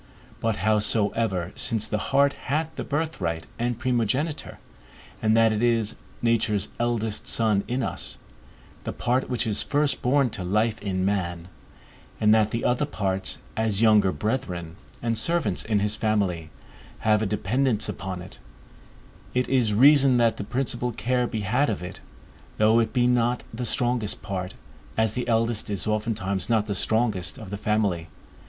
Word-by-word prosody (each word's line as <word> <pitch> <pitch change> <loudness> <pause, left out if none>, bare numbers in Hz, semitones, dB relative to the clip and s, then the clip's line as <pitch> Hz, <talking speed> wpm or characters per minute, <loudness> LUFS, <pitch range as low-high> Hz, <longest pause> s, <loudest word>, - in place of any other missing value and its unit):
But 115 -1 0
howsoever, 105 -3 +2
since 110 -2 0
the 105 0 -2
heart 140 +1 +4 0.2
hath 155 +3 -1
the - - -4
birthright 145 - -2
and 120 0 -1
primogeniture, 130 +5 -1 0.6
and 110 0 +3
that 115 -1 +5
it 105 - -1
is 115 -2 +2 0.3
nature's 110 -4 +1
eldest 115 -3 -1
son 110 -3 +2
in 125 +1 -1
us, 60 - -4 0.7
the - - -4
part 125 +2 0
which 125 -2 0
is 105 -2 +1
first 145 -2 0
born 135 -1 +2
to 100 -4 -5
life 110 +4 0
in 95 -2 -1
man, 90 -3 -2 0.7
and 105 0 +5
that 110 -1 +4
the 115 +1 -3
other 125 +4 +1
parts, 95 -7 -2 0.2
as 110 -1 +1
younger 105 -4 +5
brethren, 90 - -3 0.3
and 115 -2 +1
servants 170 - +1
in 105 -2 +1
his 105 +1 +1
family, 95 -7 0 0.5
have 105 -1 +3
a 110 - 0
dependance 110 +3 0
upon 95 -2 -5
it, 90 - -13 1.0
it 125 0 +1
is 125 -5 +2
reason 135 +3 +6
that 115 -2 +3
the - - -4
principal 125 +1 -1
care 125 +2 0
be 110 -2 -3
had 125 +9 +1
of 100 -4 -3
it, 90 - -7 0.6
though 110 +2 +4
it 115 -1 +1
be 125 -2 +2
not 125 0 +2
the 120 +1 -3
strongest 120 -2 -1
part, 95 -1 -4 0.4
as 110 -1 +2
the 125 0 -3
eldest 115 -1 +1
is 100 -2 -2
oftentimes 105 -3 -1
not 110 -3 +2
the 105 - -2
strongest 110 -1 0
of 110 -6 -9
the - - -2
family. 105 -5 0
110 Hz, 160 wpm, -25 LUFS, 100-120 Hz, 1.0 s, reason